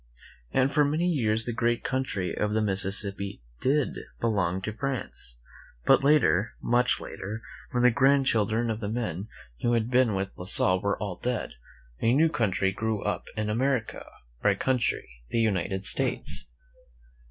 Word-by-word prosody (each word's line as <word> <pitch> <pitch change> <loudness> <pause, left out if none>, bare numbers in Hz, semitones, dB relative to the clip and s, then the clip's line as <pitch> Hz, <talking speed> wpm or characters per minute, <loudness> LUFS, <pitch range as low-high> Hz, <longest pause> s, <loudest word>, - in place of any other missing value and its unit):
And 135 +1 +2
for 150 +2 +4
many 155 +5 +1
years 115 -9 +1
the 120 - -3
great 120 0 0
country 130 -8 -2
of 105 0 -1
the 110 - +1
Mississippi 100 - 0 0.2
t^iai 140 +1 +1 0.3
belong 95 -6 0
to 110 - -3
France. 115 - -5 0.5
But - - +5
later, 140 -9 +3
much 125 +1 +2
later, 105 +4 -7 0.3
when 125 0 0
the 125 - +6
grandchildren 120 -4 +2
of 110 - -3
the 105 -2 -4
men?; 105 -4 -3 0.3
who 120 - +1
had 115 +1 0
been 125 -4 +3
with 95 0 -2
La 90 - -7
Salle 95 -1 +3
were 100 0 0
all 100 -4 -4
dead, 125 -2 -3 0.5
a 115 - +3
new 160 +3 +4
country 100 -7 0
grew 110 +1 -2
up - - -2
in 105 0 -1
America 120 +2 -1 0.2
— - - -32
our - - +4
country, 125 -2 0 0.2
the - - 0
United 95 -3 0
States. - - +1
110 Hz, 160 wpm, -27 LUFS, 100-125 Hz, 0.5 s, the